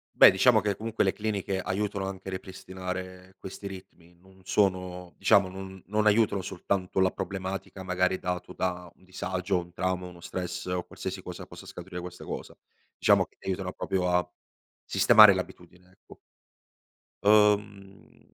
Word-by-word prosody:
Beh, -, -, +10 dB
diciamo 110 Hz, +4 st, +5 dB
che 100 Hz, 0 st, -1 dB
comunque 110 Hz, -1 st, -1 dB
le 95 Hz, -, +2 dB
cliniche 105 Hz, -3 st, -2 dB
aiutano 100 Hz, +1 st, -2 dB
anche 95 Hz, 0 st, -7 dB
a -, -, -3 dB
ripristinare 95 Hz, 0 st, -7 dB
questi 95 Hz, +1 st, -9 dB
ritmi. 90 Hz, -3 st, -12 dB
Non 95 Hz, +2 st, -22 dB
sono 90 Hz, -2 st, 0 dB
diciamo 100 Hz, -2 st, +4 dB
non 95 Hz, 0 st, -9 dB
non 105 Hz, +3 st, 0 dB
aiutano 105 Hz, -2 st, +3 dB
soltanto 95 Hz, 0 st, -2 dB
la 95 Hz, 0 st, +4 dB
problematica 95 Hz, 0 st, -5 dB
magari 90 Hz, 0 st, 0 dB
dato 90 Hz, 0 st, -4 dB
da 90 Hz, -1 st, -3 dB
un -, -, -27 dB
disagio, 95 Hz, 0 st, -2 dB
un 85 Hz, 0 st, -9 dB
trauma, 90 Hz, 0 st, -2 dB
uno 90 Hz, -1 st, -12 dB
stress 90 Hz, 0 st, -5 dB
o 90 Hz, -1 st, -2 dB
qualsiasi 95 Hz, +2 st, -6 dB
cosa 90 Hz, -1 st, -8 dB
possa -, -, -12 dB
scaturire 90 Hz, 0 st, -8 dB
questa 90 Hz, 0 st, -9 dB
cosa. -, -, -6 dB, 0.4 s
Diciamo -, -, +4 dB
che -, -, -32 dB
aiutano 95 Hz, -1 st, -3 dB
proprio 90 Hz, -1 st, -1 dB
a 90 Hz, 0 st, +1 dB, 0.5 s
sistemare 105 Hz, -2 st, +7 dB
l'abitudine, 90 Hz, -1 st, -8 dB
ecco. 95 Hz, -, -18 dB, 1.1 s
Uhm, 105 Hz, -2 st, +1 dB
95 Hz, 150 wpm, -28 LUFS, 90-100 Hz, 1.1 s, Beh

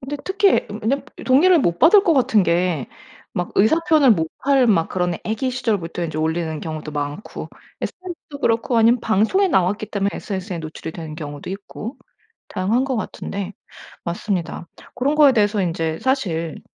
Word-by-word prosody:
근데 275 Hz, +3 st, -5 dB
특히 395 Hz, +1 st, +2 dB, 0.2 s
왜냐면 270 Hz, +4 st, 0 dB, 0.2 s
동의를 330 Hz, +8 st, +5 dB
못 175 Hz, -, +1 dB
받을 390 Hz, +5 st, +7 dB
것 335 Hz, -, +4 dB
같은 225 Hz, -6 st, +3 dB
게 170 Hz, -4 st, +1 dB, 0.5 s
막 175 Hz, 0 st, -3 dB
의사 220 Hz, +11 st, +4 dB
표현을 300 Hz, -5 st, +6 dB
못 160 Hz, -4 st, 0 dB, 0.2 s
할 275 Hz, -2 st, +4 dB
막 175 Hz, -8 st, +3 dB
그런 180 Hz, -2 st, -1 dB
아기 225 Hz, +4 st, -1 dB
시절부터 210 Hz, -9 st, -2 dB
인제 155 Hz, -2 st, -4 dB
올리는 160 Hz, 0 st, -1 dB
경우도 155 Hz, -1 st, -6 dB
많고 145 Hz, +6 st, -5 dB, 0.3 s
SNS도 345 Hz, -5 st, -7 dB
그렇고 230 Hz, +1 st, +1 dB
아니면 230 Hz, +2 st, +4 dB
방송에 225 Hz, -, +2 dB
나왔기 195 Hz, -, +1 dB
때문에 200 Hz, -1 st, 0 dB
SNS에 190 Hz, -2 st, -5 dB
노출이 160 Hz, 0 st, -7 dB
되는 160 Hz, -3 st, -7 dB
경우도 145 Hz, 0 st, -7 dB
있고 205 Hz, +5 st, -7 dB, 0.5 s
다양한 210 Hz, +7 st, 0 dB
것 265 Hz, -2 st, -1 dB
같은데 200 Hz, -2 st, -5 dB, 0.5 s
맞습니다. 175 Hz, -1 st, -3 dB, 0.3 s
고런 280 Hz, +4 st, 0 dB
거에 295 Hz, -3 st, +7 dB
대해서 210 Hz, -2 st, +2 dB
인제 165 Hz, -2 st, -2 dB
사실 175 Hz, -, -1 dB
205 Hz, 355 characters per minute, -21 LUFS, 170-260 Hz, 0.5 s, 받을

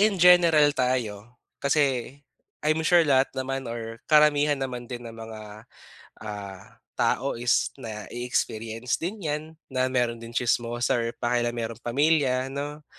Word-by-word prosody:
in 210 Hz, -1 st, +3 dB
general 170 Hz, -4 st, +6 dB
tayo. 125 Hz, -4 st, -2 dB, 0.2 s
Kasi 135 Hz, -3 st, +1 dB, 0.5 s
I'm 155 Hz, +1 st, +2 dB
sure 170 Hz, +1 st, +4 dB
lahat 135 Hz, -2 st, +3 dB
naman 135 Hz, -1 st, -3 dB
or 115 Hz, -1 st, -6 dB
karamihan 150 Hz, -1 st, +5 dB
naman 125 Hz, -3 st, -5 dB
din 120 Hz, -1 st, -6 dB
ng 115 Hz, -, -8 dB
mga, 110 Hz, -1 st, -10 dB, 0.5 s
ah, 100 Hz, -3 st, -8 dB, 0.2 s
tao 140 Hz, +2 st, +1 dB
is 120 Hz, 0 st, +1 dB
na-e-experience 115 Hz, +1 st, -3 dB
din 195 Hz, +2 st, -4 dB
yan, 150 Hz, 0 st, -1 dB, 0.3 s
na 130 Hz, 0 st, +1 dB
meron 120 Hz, -2 st, 0 dB
din 115 Hz, -, -8 dB
tsismosa 120 Hz, 0 st, 0 dB
or 115 Hz, -, -1 dB
pakialamerong 120 Hz, -1 st, -1 dB
pamilya, 135 Hz, 0 st, +2 dB
'no. 145 Hz, +2 st, -6 dB
125 Hz, 130 wpm, -26 LUFS, 115-145 Hz, 0.5 s, general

